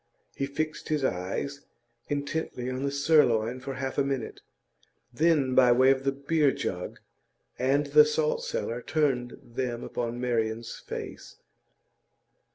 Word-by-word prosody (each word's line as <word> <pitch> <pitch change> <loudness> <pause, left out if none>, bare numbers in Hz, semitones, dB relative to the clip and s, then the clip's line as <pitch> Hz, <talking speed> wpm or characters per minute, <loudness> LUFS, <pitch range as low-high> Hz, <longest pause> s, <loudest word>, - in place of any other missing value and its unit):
He 135 - -2
fixed 155 +2 -4
his 150 -2 0
eyes 100 +9 -3 0.5
intently 145 -3 -3
on 130 +1 -3
the 140 - 0
sirloin 130 -5 +3
for 135 +1 -6
half 130 +1 -3
a - - +4
minute; 135 -4 -3 0.7
then, 150 -2 +3
by 125 -1 +6
way 130 +2 +6
of 135 0 0
the 135 - +3
beer 140 +1 +2
jug 95 -10 -4 0.6
and 135 +3 +2
the 150 +1 +7
salt 150 0 0
cellar, 120 +2 -3
turned 130 -5 0
them 120 0 -4
upon 120 0 -3
Marian's 115 -2 -2
face. - - -8
135 Hz, 135 wpm, -28 LUFS, 120-145 Hz, 0.7 s, the